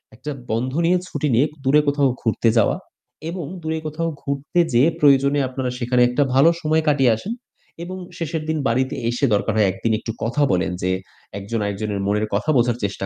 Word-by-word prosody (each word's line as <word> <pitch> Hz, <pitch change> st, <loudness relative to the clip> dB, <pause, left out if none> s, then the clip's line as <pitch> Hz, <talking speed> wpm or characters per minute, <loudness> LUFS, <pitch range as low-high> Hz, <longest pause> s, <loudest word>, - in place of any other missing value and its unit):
একটা 130 Hz, +6 st, -8 dB, 0.2 s
বন্ধ 125 Hz, +4 st, -1 dB
নিয়ে 180 Hz, +2 st, +4 dB
ছুটি 150 Hz, -, -2 dB
নিয়ে 130 Hz, +5 st, +4 dB
ক -, -, -19 dB
দূরে 140 Hz, +3 st, +4 dB
কোথাও 145 Hz, -1 st, +3 dB
ঘুরতে 115 Hz, 0 st, +1 dB
যাওয়া 105 Hz, -, +3 dB, 0.5 s
এবং 175 Hz, -2 st, -5 dB, 0.2 s
দূরে 160 Hz, 0 st, -2 dB
কোথাও 165 Hz, +2 st, -2 dB
ঘুরতে 140 Hz, +4 st, -2 dB
যেয়ে 125 Hz, +7 st, +5 dB
প্রয়োজনে 140 Hz, -1 st, +4 dB
আপনারা 130 Hz, 0 st, -3 dB
সেখানে 125 Hz, 0 st, +1 dB
একটা 125 Hz, +4 st, +2 dB
ভালো 135 Hz, +5 st, +6 dB
সময় 155 Hz, +1 st, +2 dB
কাটিয়ে 135 Hz, -5 st, +4 dB
আসেন 200 Hz, -, -5 dB, 0.5 s
এবং 185 Hz, +2 st, -6 dB, 0.2 s
শেষের 160 Hz, -1 st, -3 dB
দিন 160 Hz, -, 0 dB
বাড়িতে 130 Hz, +4 st, 0 dB
এসে 120 Hz, +4 st, 0 dB
দরকার 105 Hz, +2 st, +1 dB
হয় 105 Hz, -2 st, +4 dB
একদিন 95 Hz, +4 st, -2 dB
একটু 115 Hz, -, -5 dB
কথা 120 Hz, +6 st, -1 dB
বলেন 90 Hz, 0 st, +1 dB
যে 90 Hz, -, +1 dB, 0.5 s
একজন 105 Hz, +4 st, -3 dB
আরেকজনের 100 Hz, 0 st, -3 dB
মনের 105 Hz, +1 st, +1 dB
কথা 105 Hz, +10 st, -1 dB
বোঝার 120 Hz, -1 st, +2 dB
চেষ্টা 100 Hz, -1 st, -2 dB
130 Hz, 190 wpm, -21 LUFS, 115-150 Hz, 0.5 s, ভালো